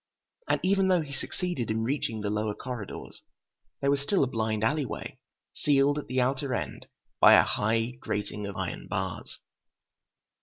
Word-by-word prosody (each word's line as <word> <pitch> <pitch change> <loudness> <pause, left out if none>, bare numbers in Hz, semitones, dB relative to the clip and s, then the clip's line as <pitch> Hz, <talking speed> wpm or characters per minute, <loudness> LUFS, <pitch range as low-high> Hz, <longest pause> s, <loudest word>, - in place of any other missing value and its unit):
And - - +3
even 195 +1 +3
though 180 -2 +4
he 145 -3 -7
succeeded 175 -4 -3
in 110 +1 0
reaching 115 -3 -1
the 105 0 -1
lower 105 0 -1
corridors, 125 -6 -7 0.6
there 140 - +3
was 140 - +2
still 145 +4 +2
a - - +2
blind 110 -3 -1
alley 150 +6 +2
way, 125 - -6 0.3
sealed 145 0 +3
at - - -8
the 130 +1 0
outer 130 +1 +1
end 80 -10 -5 0.3
by - - +9
a - - +8
high 115 +3 +1
grating 105 0 -3
of 100 - -6
iron 95 -3 -4
bars.... 95 -2 -4
125 Hz, 165 wpm, -28 LUFS, 105-140 Hz, 0.6 s, by